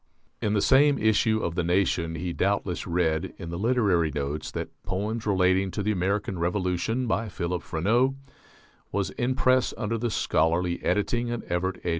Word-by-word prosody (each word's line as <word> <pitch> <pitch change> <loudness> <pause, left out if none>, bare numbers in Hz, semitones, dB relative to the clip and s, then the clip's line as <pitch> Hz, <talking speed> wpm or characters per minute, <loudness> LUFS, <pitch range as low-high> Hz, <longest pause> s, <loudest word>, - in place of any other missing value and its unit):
In 105 - 0
the 100 - +2
same 140 +2 +5
issue 110 0 +2
of 85 - -1
the 90 0 -1
Nation 85 -2 +1
he 85 +2 -3
doubtless 95 -2 -1
read, 85 -3 0
in 85 - -7
the 85 - -4
"Literary 100 -8 +2
Notes," 75 +1 -3
that - - -5
"Poems 105 +4 -3
Relating 95 -1 +3
to 100 +2 -3
the 105 - +1
American 95 -1 -1
Revolution," 90 +7 0
by 115 -1 -1
Philip 90 -2 -3
Freneau, 115 +11 +1 0.8
was 100 -2 -1
"in 125 +2 -1
press 130 -1 +2
under 115 0 -2
the 120 +1 -1
scholarly 85 -2 +1
editing 120 +3 0
of 120 -1 -3
Evart 90 +1 -2
A. - - 0
95 Hz, 170 wpm, -26 LUFS, 85-110 Hz, 0.8 s, same